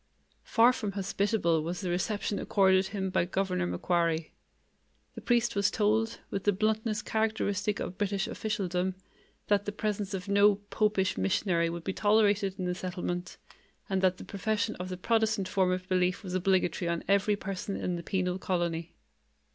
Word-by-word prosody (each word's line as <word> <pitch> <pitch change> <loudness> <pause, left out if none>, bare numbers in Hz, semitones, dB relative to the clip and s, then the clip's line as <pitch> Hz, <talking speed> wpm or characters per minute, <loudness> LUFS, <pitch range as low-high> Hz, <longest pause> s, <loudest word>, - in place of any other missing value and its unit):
Far 235 +2 +5
from 210 -6 -3
hospitable 195 -3 +1
was 175 +4 -4
the 180 -3 -2
reception 205 +3 -1
accorded 190 -1 +3
him 190 -1 -3
by 170 - +2
Governor 185 -1 -1
Macquarie. 170 -3 0 0.8
The - - -9
priest 235 -2 +1
was 200 0 +3
told, 220 +1 +1
with 195 - -2
the 205 - +4
bluntness 215 +2 0
characteristic 215 -2 0
of 185 - -5
British 200 -1 0
officialdom, 185 -3 -2 0.5
that 205 -1 +2
the 205 - -2
presence 210 -1 -2
of 185 0 -6
no 200 +1 +5
"popish 205 - 0
missionary" 170 - +1
would 170 0 -5
be 190 - -2
tolerated 205 -2 +2
in 185 - -3
the 180 - 0
settlement, 180 -1 -4 0.5
and 190 -1 +1
that 185 -1 +3
the - - -9
profession 215 +2 -1
of 180 +1 -5
the 185 - -4
Protestant 220 -1 +1
form 185 -1 +2
of 185 0 -2
belief 185 +1 +1
was 185 -2 -6
obligatory 185 -2 +1
on 170 -1 -2
every 200 +1 +3
person 195 0 -4
in 180 - -2
the 170 - -4
penal 185 0 -1
colony. 170 -3 -2
195 Hz, 165 wpm, -29 LUFS, 180-210 Hz, 0.8 s, Far